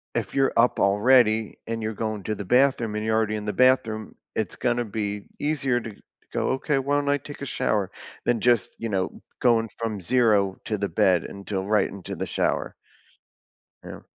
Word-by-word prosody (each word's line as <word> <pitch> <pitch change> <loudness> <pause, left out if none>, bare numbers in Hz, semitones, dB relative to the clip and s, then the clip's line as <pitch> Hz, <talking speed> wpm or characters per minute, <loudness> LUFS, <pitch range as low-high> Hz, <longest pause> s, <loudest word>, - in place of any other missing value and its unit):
if - - -2
you're 135 -1 +2
up 120 +2 +4
already 110 +2 +3
and 115 0 -3
you're 110 +1 -2
going 110 -1 -3
to 110 - -2
the 100 - -6
bathroom 125 -1 +2
and 105 0 -2
you're 110 0 +1
already 110 -1 +1
in 105 -1 -5
the 105 - -2
bathroom, 125 -4 +2 0.2
it's 110 -4 -2
gonna 120 -1 0
be 105 -1 -4
easier 140 -5 0
to 115 -1 -7
to - - -21 0.3
go, - - 0
"Okay, 135 +2 0
why 140 +2 0
don't 145 0 +1
I 145 0 +2
take 145 +1 -9
a - - -3
shower?" 105 -6 -1 0.3
Than 120 -2 +1
just, 120 -4 +2
you 115 - -3
know, 95 -3 -2 0.2
going 115 -2 +3
from 110 -4 -3
zero 105 -3 +2
to 105 -3 -2
the 100 - -1
bed, 90 +1 +3
until 100 -1 -4
right 105 +2 +2
into 100 -2 -7
the - - -3
shower. - - -1 1.1
Yeah. - - -9
110 Hz, 195 wpm, -25 LUFS, 105-125 Hz, 1.1 s, up